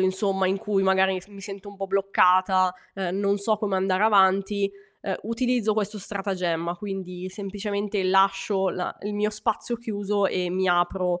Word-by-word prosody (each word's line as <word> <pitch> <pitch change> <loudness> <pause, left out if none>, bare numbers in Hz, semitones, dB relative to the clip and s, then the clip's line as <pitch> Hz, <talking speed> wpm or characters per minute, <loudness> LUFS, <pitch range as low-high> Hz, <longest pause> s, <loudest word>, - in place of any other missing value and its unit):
insomma, 190 0 +2
in 190 +1 +1
cui 205 -2 0
magari 190 0 +3
mi 185 - -3
s 180 - -15
mi 200 -1 -12
sento 195 0 -8
un 200 - -11
po' 195 0 -4
bloccata, 185 -1 +3 0.2
uhm, 190 -1 -2
non 200 0 +1
so 215 +2 +1
come 200 -3 -1
andare 190 +1 +1
avanti, 200 -1 +3 0.3
uhm, 195 - -2
utilizzo 230 -1 0
questo 210 0 -1
stratagemma. 180 -4 -2
Quindi, 185 -2 -6
semplicemente 200 +1 -3
lascio 195 +1 +2
la 180 - -4
il 205 +1 -4
mio 210 +1 0
spazio 215 +2 -1
chiuso, 205 -3 -1
e 180 -1 -1
mi 190 +1 0
apro, 175 0 +1
195 Hz, 170 wpm, -25 LUFS, 185-205 Hz, 0.3 s, magari